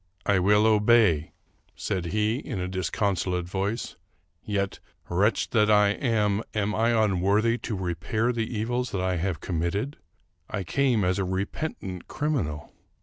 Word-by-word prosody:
" 90 - -35
I - - +3
will 105 +3 +4
obey," 105 -7 +4 0.4
said 95 -4 -2
he, 110 +5 +1
in 130 - -5
a 90 - -2
disconsolate 90 -1 -1
voice; 100 +5 -3 0.2
" - - -45
yet, 100 -2 -2 0.3
wretch 100 +6 +1
as 105 -1 +4
I 105 -1 +5
am, 105 -2 +1
am 105 0 0
I 115 +2 +2
unworthy 110 +1 +2
to 110 - -4
repair 95 +7 -1
the 115 0 -2
evils 120 +3 -1
that 95 - -1
I 95 -1 0
have 90 -1 -2
committed? 95 - -2 0.5
I 100 - -3
came 125 +2 +1
as 90 +2 +1
a - - +1
repentant 95 - -4
criminal. 115 - -2
100 Hz, 150 wpm, -26 LUFS, 90-110 Hz, 0.5 s, I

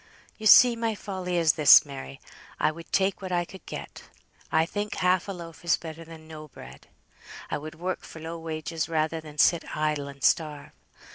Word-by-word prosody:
"You 215 - 0
see 240 +3 +8
my 230 -1 -2
folly 185 -3 -4
is 165 -2 +4
this, 150 -1 +7
Mary. 135 -1 -9 0.4
I - - +2
would 165 +1 -12
take 195 0 +1
what 185 -1 -6
I 175 -1 0
could 190 +2 -13
get; - - -8 0.5
I 160 0 +3
think 205 +4 -4
half 180 0 +1
a - - -3
loaf 170 -4 -10
is 170 - +2
better 160 0 -9
than 160 -1 -13
no 155 -1 -10
bread. 65 - -14 0.6
I - - -1
would 155 +1 -9
work 180 +3 -4
for 160 - -11
low 165 +1 -7
wages 160 0 -4
rather 160 0 -1
than 150 -1 -12
sit 170 +2 +2
idle 150 -2 -1
and 140 -1 -11
starve. 150 -3 +1
165 Hz, 195 wpm, -26 LUFS, 155-180 Hz, 0.6 s, see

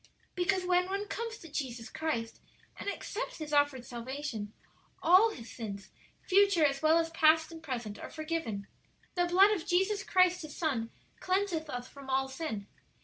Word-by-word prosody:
"Because 365 +1 +1
when 360 0 +3
one 400 +2 -2
comes 460 0 -4
to 330 - -12
Jesus 255 -6 -4
Christ 235 -8 -3 0.3
and - - -4
accepts 435 +3 -4
His 305 -2 -6
offered 285 -4 +2
salvation, 240 -3 -5 0.5
all 370 +7 +7
his 235 - -9
sins, 200 -4 -7 0.3
future 395 -4 +5
as 275 -1 +1
well 315 +1 +5
as 330 -1 0
past 320 0 +4
and 325 -1 -9
present, 235 -8 -5
are - - -7
forgiven. 310 -11 -3 0.5
'The 355 -1 +2
blood 380 +4 +6
of 385 -6 -2
Jesus 385 +3 +2
Christ, 365 -2 +3
His 310 -2 -8
Son, 260 -9 -1 0.3
cleanseth 370 -4 0
us 245 -2 -4
from 275 -1 -12
all 265 0 +2
sin.' 265 -7 -4
315 Hz, 165 wpm, -31 LUFS, 260-365 Hz, 0.5 s, all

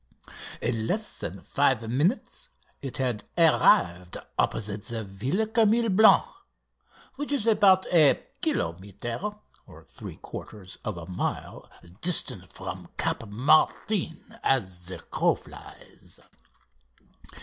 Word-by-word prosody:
In 110 -1 -1
less 215 - -1
than 95 +3 -5
five 130 -5 +1
minutes 180 - -1 0.3
it 135 -3 -6
had 125 -5 -1
arrived 90 - +4 0.2
opposite 105 -1 0
the 115 +1 -3
Villa 125 - -2
Camille 225 +1 +3
Blanc, 215 +3 +6 0.9
which 290 0 -4
is 275 -7 0
about 200 -4 +5
a 155 -5 +5 0.2
kilometre 95 +7 -2 0.5
(3/4 95 -4 -10
of 110 -5 -4
a 85 - -7
mile) 90 0 -4 0.3
distant 180 0 +1
from - - -7
Cap 115 - -1
Martin 155 - +1
as 95 -9 0
the 95 - -6
crow - - 0
flies. - - -14
130 Hz, 105 wpm, -27 LUFS, -, 0.9 s, Blanc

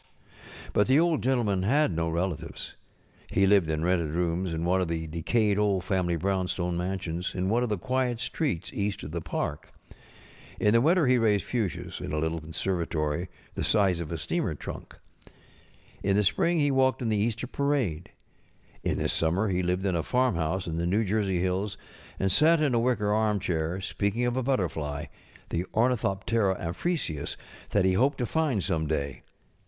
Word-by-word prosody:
But 105 - +3
the 135 +3 +5
Old 165 -2 +2
Gentleman 120 -7 +1
had 140 +7 +3
no 85 0 0
relatives. 85 -1 -3 0.5
He 95 - +2
lived 95 -4 +4
in 80 +1 0
rented 85 -3 +1
rooms 85 +2 -1
in 80 +1 -2
one 95 +2 +2
of 90 - 0
the 80 -1 -2
decayed 100 +6 +1
old 100 -3 +2
family 90 -4 0
brownstone 90 0 -1
mansions 90 -1 -3
in 95 0 0
one 115 +3 +2
of 125 - 0
the 105 - 0
quiet 125 +3 -1
streets 125 - -2
east 100 0 -2
of 75 - -6
the 85 +1 -3
park. 75 -2 -4 0.9
In 105 - +3
the 115 - +5
winter 165 +3 +4
he 125 -1 +4
raised 105 -3 +3
fuchsias 110 -7 -3
in - - -5
a - - 0
little 80 +1 -1
conservatory 80 0 -2 0.2
the - - -3
size 95 -5 +2
of 85 -2 -5
a 85 - -2
steamer 70 - -1
trunk. - - -8 1.1
In 100 0 +1
the 105 - +3
spring 170 - +2
he 145 -1 +3
walked 130 -1 +2
in 115 - 0
the 110 - +1
Easter 115 +3 -1
parade. 125 - -1 0.7
In - - 0
the - - 0
summer 95 +6 +1
ho 90 - 0
lived 90 +1 0
at 95 - +1
a 85 - +1
farmhouse 95 -7 0
in 80 -1 -3
the 85 +1 0
New 105 +5 +2
Jersey 100 -3 0
hills, 95 +2 -1 0.4
and 95 0 +1
sat 160 - +5
in 150 -4 +2
a 120 - +3
wicker 115 -4 +1
armchair, 95 -6 0
speaking 100 +4 -1
of 120 0 0
a 130 - +1
but┬¼ 130 +1 +2
terfly, 75 -4 -3 0.4
the 85 - -1
ornithoptcra 105 -4 +1
amphrisius, 85 - -2 0.3
that 100 -2 +2
he 95 - +3
hoped 135 +8 +2
to 125 +5 -1
And 135 - +1
some 80 -1 0
day. 70 -3 -2
95 Hz, 180 wpm, -28 LUFS, 85-120 Hz, 1.1 s, the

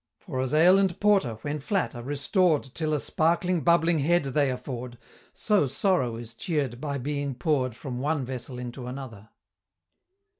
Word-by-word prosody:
For 135 -9 -4
as 130 -1 -2
ale 175 +5 +6
and 190 -2 +1
porter, 200 - +3
when 150 +1 -2
flat, 190 +6 -1
are 120 - -7
restored 145 - +1
Till 155 -2 -2
a - - 0
sparkling 170 +4 +1
bubbling 170 -1 +3
head 175 +4 +2
they 140 +1 +1
afford, 125 -1 -5 0.4
So 205 -9 +2
sorrow 135 - +1
is 115 0 -9
cheer'd 135 -2 -2
by 145 -2 -2
being 140 0 -3
pour'd 130 -3 0
From 125 -1 -6
one 145 0 -1
vessel 125 0 -6
into 125 0 -6
another. 125 -5 -8
145 Hz, 160 wpm, -27 LUFS, 125-165 Hz, 0.4 s, ale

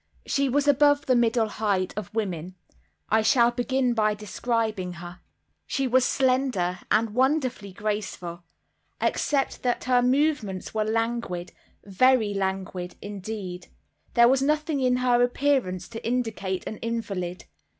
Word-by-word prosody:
She 275 -1 +1
was 290 +3 +1
above 290 0 +4
the 255 - +3
middle 230 -1 +2
height 205 -3 -1
of 205 -1 -5
women. 185 -5 -3 0.5
I 220 +1 +4
shall 235 +2 +4
begin 250 +1 0
by 215 -2 +2
describing 215 -3 -2
her. 175 +1 -10 0.5
She 275 - -1
was 255 0 +3
slender, 255 -9 +1
and 225 0 +2
wonderfully 255 -4 0
graceful. 195 -4 -4 0.6
Except 280 -2 0
that 245 -1 0
her 250 -1 +3
movements 250 -7 0
were 215 -1 0
languid—very 225 +1 0
languid—indeed, 190 0 -5 0.5
there 235 -1 +7
was 265 +1 +3
nothing 300 +1 0
in 255 -1 +2
her 250 -1 +3
appearance 245 -8 +1
to 225 -1 -8
indicate 220 -6 -2
an 215 - -5
invalid. 200 -6 -4
225 Hz, 125 wpm, -26 LUFS, 195-255 Hz, 0.6 s, there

